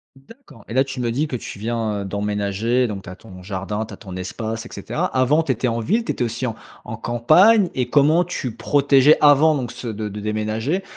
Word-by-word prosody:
D'accord 135 - -17
et - - -7
là, 130 +2 +4
tu 135 -1 -7
me 120 -1 -1
dis 145 +7 -1
que 135 - -4
tu 110 - -7
viens, 110 -2 -2
heu, - - -5
d'emménager, 105 +4 -1
donc 100 -3 -6
tu - - -10
as 90 - -8
ton 90 -1 -13
jardin, 100 +3 -4
tu - - -11
as - - -10
ton 95 -5 -10
espace, 110 +4 -5
et - - -10
cetera. - - -3
Avant 135 +5 +3
tu 145 - -1
étais 125 +1 -1
en 115 -1 -1
ville, 220 - 0
tu - - -2
étais - - -2
aussi 120 +2 -3
en 115 - -4 0.3
en 115 - -7
campagne 170 - +4
et 125 -2 -1
comment 150 +6 +4
tu 130 -9 -5
protégeais 140 +2 +4
avant 150 +2 +6
donc 125 -4 -3
ce 120 - -8
de 110 -1 -4
de 105 +1 -7
déménager, 110 - -2
120 Hz, 235 wpm, -21 LUFS, 105-140 Hz, 0.3 s, avant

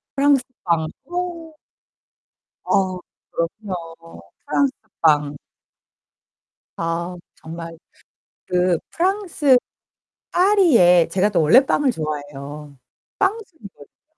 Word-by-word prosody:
프랑스 280 -1 +3 0.2
빵. 165 -2 +1 0.2
어. 350 -2 -5 1.1
어. 185 -1 +1 0.3
그럼요. 165 - -6 0.2
프랑스 280 -2 +1 0.3
빵. 150 -2 +3 1.4
아, 170 +2 -3 0.2
정말 165 +1 -9 0.7
그 180 -1 +1
프랑스 345 -7 +2 0.7
파리에 325 - +5
제가 190 +4 +2
또 175 -5 +2
원래 245 - +6
빵을 275 -1 +2
좋아해요. 145 - -6 0.4
빵순이거든요. 380 - -4
180 Hz, 170 characters per minute, -21 LUFS, -, 1.4 s, 원래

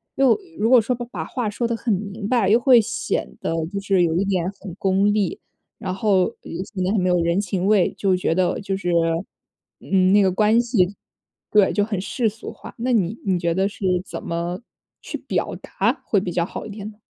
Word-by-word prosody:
又 270 -3 +4 0.2
如 225 +2 +2
果 250 -3 +7
说 250 +4 -1
把 240 +1 -6
话 240 -5 -2
说 235 +3 -2
得 235 - -1
很 225 -3 0
明 200 +1 -4
白， 230 -6 +2
又 230 +3 +5
会 245 -2 +6
显 225 +2 -3
得 - - -1 0.2
就 200 - -1
是 195 -2 +2
有 160 -1 +1
一 195 - +1
点 185 -1 0
很 190 -4 -8
功 195 +1 +2
利， 215 - 0 0.4
然 185 -4 -4
后， 195 -2 +3
呃， 230 - -6 0.4
显 185 -2 -2
得 185 - +1
很 210 - +2
没 185 - +1
有 180 - +3
人 170 +3 +1
情 190 -1 -2
味， 205 -4 +3
就 190 -2 +2
觉 165 -2 0
得 185 -1 +1
就 195 -1 -2
是， 180 -2 -3 0.9
嗯， 185 -1 +2
那 205 - +6
个 190 - +4
关 215 +4 +3
系 205 -5 +1 0.6
对， 210 -2 +5
就 205 0 +2
很 205 -4 -3
世 235 +3 -1
俗 220 +2 -9
化， - - -12
那 250 +2 0
你 210 +1 +1
你 185 -2 +1
觉 170 -1 0
得 190 +2 +1
是 200 - -7 0.2
怎 - - -6
么 170 +4 -3 0.4
去 - - -5
表 - - -2
达 - - -1
会 200 - +2
比 180 - -3
较 170 - +1
好 - - -7
一 - - -8
点 205 0 -7
呢？ 210 - -21
200 Hz, 240 characters per minute, -22 LUFS, 185-220 Hz, 0.9 s, 果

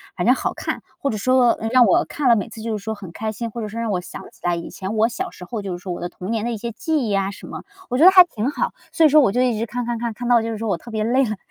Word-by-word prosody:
反 180 +4 -1
正 250 - +6
好 - - -2
看。 - - -4 0.2
或 280 - -1
者 215 - -2
说， 255 +2 +3
嗯， 225 - -2
让 255 -1 +6
我 345 +6 +3
看 285 -4 -1
了 235 - +7
每 210 - -2
次 225 -1 -10
就 220 -1 -2
是 195 - -11
说 220 +1 -3
很 195 -5 -10
开 220 +5 -4
心， 230 +2 -5
或 235 +2 -6
者 215 - -3
说 220 +2 -6
让 230 - -2
我 185 - 0
想 180 - -9
起 - - -23
来 175 0 +1
以 170 - -6
前 195 +2 -5
我 220 +1 +4
小 365 +10 -4
时 180 - -12
候 215 +5 -5
就 195 - -4
是 175 - -10
说 185 - -5
我 175 - -4
的 175 - -3
童 180 +2 -8
年 225 -1 -1
的 240 - -1
一 230 - -3
些 235 +2 -5
记 315 +8 -1
忆 230 -5 -2
呀 195 0 0
什 - - -11
么， - - -8 0.3
我 250 - -1
觉 310 - +6
得 375 - +10
还 370 -1 +10
挺 255 -5 -3
好。 - - -1 0.2
所 325 - +2
以 305 - +7
说 305 - +6
我 205 - +3
就 245 - +1
一 245 -3 +1
直 230 - -1
看 245 +1 -4
看 240 - -1
看， 235 0 -3
看 240 +3 -6
到 245 -1 +5
就 230 - -3
是 220 - -4
说 225 - -2
我 180 - +1
特 235 - -12
别 215 -1 -1
累 255 +4 +2
了， 215 -2 -3
225 Hz, 390 characters per minute, -21 LUFS, 210-245 Hz, 0.3 s, 得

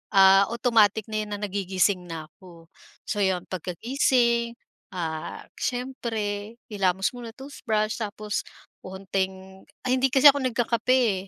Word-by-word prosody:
ah, 195 0 +7
automatic 220 -3 +3
na 215 - -1
'yan 210 -1 -3
na - - -7
nagigising 190 -2 0
na 160 -2 -7
ko. 170 -3 -16 0.3
So 210 - -3
'yon 190 -3 +1
pagkagising, 235 - +1 0.4
ah, 160 -3 -4 0.2
siyempre 230 -4 -3 0.2
hilamos 190 -1 +1
muna, 235 -2 -9
toothbrush, 225 -5 -2
tapos 210 -1 -4 0.3
onting 190 0 -5 0.2
ay 255 0 +1
hindi 270 - +4
kasi 275 +2 +8
ako 285 - -3
nagkakape, 235 -4 +1
210 Hz, 120 wpm, -25 LUFS, 190-235 Hz, 0.4 s, kasi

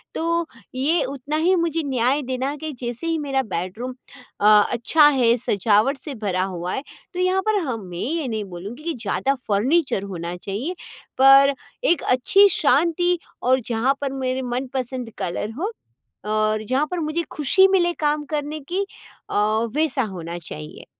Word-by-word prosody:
तो 335 0 0 0.3
ये 300 +6 +2
उतना 275 +2 -4
ही 350 +4 +3
मुझे 330 -2 0
न्याय 260 +1 +1
देना 260 +2 -2
कि 315 +1 -5
जैसे 240 +6 -3
ही 330 0 +1
मेरा 275 -2 0
बेडरूम 215 +5 -4 0.5
अ, - - +2 0.3
अच्छा 295 +6 +4
है 250 -5 +4
सजावट 215 +4 +2
से 285 0 -7
भरा 195 -5 -1
हुआ 180 -1 -4
है, 270 - -3 0.3
तो 360 - -5
यहाँ 370 +1 +2
पर 430 -1 +3
हाँ 250 -5 -2
मैं 180 -5 -9
ये 310 - -2
नहीं 220 -3 -2
बोलूँगी 200 - -8
कि 335 0 -2
ज़्यादा 250 +3 -1
फर्नीचर 245 - +2
होना 175 -3 -5
चाहिए 210 - -4 0.4
पर 275 +1 +7 0.3
एक 345 - +3
अच्छी 385 +11 +5
शांति 340 +3 +2 0.3
और 255 +1 +4
जहाँ 240 +3 +2
पर 275 - -1
मेरे 260 -1 -2
मनपसंद 255 0 -3
कलर 195 +5 -3
हो 400 +6 -1 0.6
और 215 0 +1
जहाँ 270 +4 +2
पर 360 - -2
मुझे 320 +1 -1
खुशी 375 +6 +4
मिले 355 -3 +2
काम 295 0 0
करने 300 +1 -2
की 390 +3 0 0.4
अ, - - -4 0.4
वैसा 300 -4 +1
होना 175 -5 -6
चाहिए। 75 - -9
265 Hz, 165 wpm, -22 LUFS, 220-315 Hz, 0.6 s, पर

